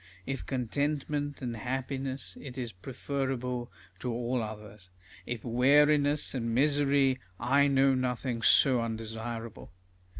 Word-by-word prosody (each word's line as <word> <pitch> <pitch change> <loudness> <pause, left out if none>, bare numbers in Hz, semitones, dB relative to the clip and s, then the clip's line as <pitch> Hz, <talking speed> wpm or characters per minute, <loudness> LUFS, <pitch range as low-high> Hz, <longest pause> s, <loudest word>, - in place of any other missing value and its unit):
If 135 - -3
contentment 145 +2 -2
and 120 -2 -3
happiness, 130 +3 -4
it 135 -2 -9
is 120 -3 -3
preferable 125 +3 -3 0.3
to 125 - -3
all 120 +1 -1
others; 105 -3 -8 0.4
if 120 -1 -4
weariness 145 +4 +4
and 115 -3 -2
misery, 140 -1 +3 0.2
I 140 +2 +4
know 135 -1 +4
nothing 125 -2 -1
so 130 +1 +5
undesirable. 115 0 -5
130 Hz, 110 wpm, -30 LUFS, 115-140 Hz, 0.4 s, so